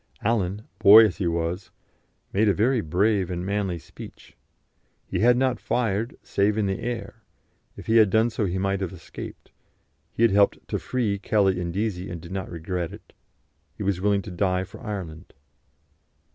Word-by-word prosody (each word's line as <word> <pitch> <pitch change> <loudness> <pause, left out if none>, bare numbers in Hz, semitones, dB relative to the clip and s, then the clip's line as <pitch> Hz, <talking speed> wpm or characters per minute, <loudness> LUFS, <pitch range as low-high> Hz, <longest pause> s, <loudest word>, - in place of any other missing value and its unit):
Allen, 105 -2 0 0.2
boy 110 +3 +9
as 105 - -2
he 95 - -1
was, 85 +3 -2 0.6
made 105 +2 +3
a 100 - +2
very 120 +3 +2
brave 95 +3 +1
and 90 0 -3
manly 100 -3 -1
speech; - - -13 0.7
he - - -3
had 120 +2 +5
not 130 -3 +1
fired, 115 -1 -1
save 100 +2 +1
in 110 - +1
the 95 -1 -1
air 115 -1 -5 0.6
if - - -9
he 115 - +3
had 110 -3 +6
done 110 +4 +3
so 110 -2 -1
he 95 0 -2
might 100 +1 -1
have 95 -3 -2
escaped; 85 -3 -10 0.6
he 115 - -1
had 115 - +5
helped 100 0 +4
to - - -2
free 110 -6 -1
Kelly 95 -3 +1
and 85 -1 -3
Deasy, 95 -1 -2
and 85 -1 -6
did 85 +2 -11
not 95 -1 -4
regret 85 0 -4
it; - - -14 0.6
he - - -4
was 95 -2 -1
willing 100 -1 +2
to 100 - -8
die 90 +1 0
for 95 - -12
Ireland. 95 -7 -7
100 Hz, 180 wpm, -25 LUFS, 90-110 Hz, 0.7 s, boy